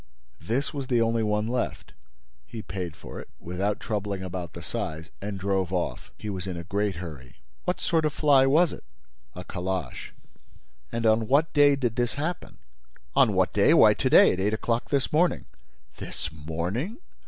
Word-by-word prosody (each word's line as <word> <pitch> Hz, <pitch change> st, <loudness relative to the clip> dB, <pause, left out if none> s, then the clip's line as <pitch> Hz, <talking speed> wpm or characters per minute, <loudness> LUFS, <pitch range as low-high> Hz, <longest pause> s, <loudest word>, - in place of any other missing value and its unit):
This 130 Hz, +8 st, -2 dB
was 140 Hz, -3 st, -4 dB
the 125 Hz, -3 st, +2 dB
only 115 Hz, 0 st, +2 dB
one 105 Hz, 0 st, 0 dB
left. 125 Hz, +1 st, -3 dB, 0.6 s
He 110 Hz, +2 st, -7 dB
paid 90 Hz, -4 st, -5 dB
for -, -, -9 dB
it, -, -, -10 dB
without 95 Hz, +4 st, -2 dB
troubling 100 Hz, -3 st, -3 dB
about 90 Hz, -3 st, -5 dB
the -, -, -8 dB
size, 80 Hz, +1 st, -4 dB
and 100 Hz, 0 st, -4 dB
drove 95 Hz, -2 st, 0 dB
off. 90 Hz, -2 st, -2 dB
He 105 Hz, -, -8 dB
was 95 Hz, -2 st, -4 dB
in 90 Hz, -2 st, -4 dB
a 85 Hz, -, -5 dB
great 100 Hz, +2 st, -1 dB
hurry." 75 Hz, -8 st, -9 dB, 0.3 s
"What 180 Hz, 0 st, -1 dB
sort 160 Hz, -2 st, +1 dB
of 155 Hz, -, +2 dB
fly 140 Hz, -3 st, +4 dB
was 155 Hz, +4 st, +4 dB
it?" -, -, -10 dB, 0.5 s
"A 90 Hz, -, -6 dB
calash." 90 Hz, -5 st, -4 dB, 0.8 s
"And 115 Hz, 0 st, -2 dB
on 110 Hz, 0 st, +3 dB
what 145 Hz, +6 st, +3 dB
day 145 Hz, -1 st, +6 dB
did 120 Hz, -5 st, -2 dB
this 120 Hz, +1 st, 0 dB
happen?" 155 Hz, +5 st, -4 dB, 0.6 s
"On -, -, +5 dB
what -, -, +2 dB
day? -, -, +5 dB
Why, -, -, +7 dB
to -, -, 0 dB
day, -, -, +7 dB
at 95 Hz, -, -4 dB
eight 105 Hz, +3 st, +1 dB
o'clock 115 Hz, +2 st, -1 dB
this 140 Hz, -1 st, 0 dB
morning." 175 Hz, +3 st, +2 dB, 0.5 s
"This 80 Hz, -, -6 dB
morning? 85 Hz, -, -3 dB
105 Hz, 180 wpm, -26 LUFS, 90-135 Hz, 0.8 s, Why